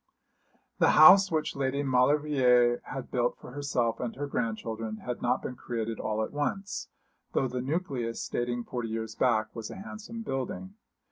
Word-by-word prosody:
The - - +5
house 185 +5 +9
which 155 -1 -1
Lady 140 +1 -1
Maulevrier 125 -2 +3
had 135 -3 -6
built 120 -1 0
for - - -11
herself 125 -4 -1
and 120 -2 -4
her 145 - -3
grandchildren 115 -3 -3
had 125 -1 -4
not 120 - +1
been 125 - -5
created 115 -2 -4
all 110 0 -1
at - - -5
once, 190 +7 -3 0.4
though 135 - +2
the 125 0 -3
nucleus 135 -5 -2
dating 120 0 -2
forty 120 -1 -4
years 110 0 -4
back 110 -3 +1
was 115 -2 -5
a - - -8
handsome 220 +3 -8
building. 135 - -4
125 Hz, 160 wpm, -29 LUFS, 115-145 Hz, 0.4 s, house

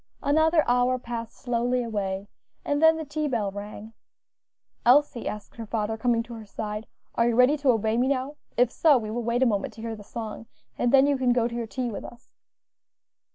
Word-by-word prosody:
Another 315 +2 +3
hour 245 +1 +3
passed 235 -2 -6
slowly 245 +1 0
away, 200 -3 -3 0.4
and 290 +1 0
then 320 0 +6
the 320 - -5
tea 300 +1 -2
bell 220 -7 -1
rang. 205 +2 -8 0.9
"Elsie," 255 0 +4
asked 210 +2 -7
her 230 - -6
father, 220 0 -1
coming 230 0 +1
to 235 - -10
her 225 -2 -9
side, 210 +1 -5 0.3
"are 235 - +2
you 235 - +1
ready 250 +4 +5
to 280 -2 +1
obey 225 -1 +2
me 250 +2 +2
now? 275 +1 -1 0.2
if 245 0 +4
so, 305 -4 +4
we 215 -3 -4
will 240 +2 -2
wait 235 +2 +1
a - - +4
moment 210 -3 0
to 220 - -11
hear 225 0 -4
the 210 - -11
song, 215 - -7 0.3
and 240 - +1
then 270 0 +6
you 285 -2 +1
can 250 -2 +3
go 235 -1 +2
to 235 - -8
your 235 -1 -3
tea 245 +1 -3
with 200 - -6
us." 240 - -12
240 Hz, 210 wpm, -26 LUFS, 220-260 Hz, 0.9 s, then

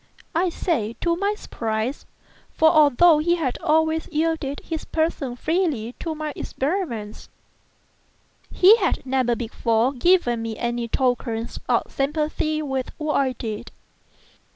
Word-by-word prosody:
I 350 +3 +2
say 235 - -1
to 340 -1 +1
my 400 +4 0
surprise, 225 - -3 0.4
for, 320 0 +4
although 305 +1 +5
he 345 +3 +2
had 285 -8 -2
always 320 +1 +1
yielded 310 -3 -1
his 320 -2 -5
person 315 -6 -1
freely 300 -6 -1
to 325 -2 -4
my 305 -1 -4
experiments, 260 - -4 1.2
he 400 +5 +7
had 380 -9 -1
never 255 -2 +1
before 230 +2 0
given 255 -5 +2
me 225 -1 -4
any 240 0 -2
tokens 240 -2 -1
of - - +1
sympathy 305 +2 -1
with 265 -3 -3
what 305 0 -2
I 265 -2 +1
did. 220 -4 -6
290 Hz, 130 wpm, -23 LUFS, 240-320 Hz, 1.2 s, he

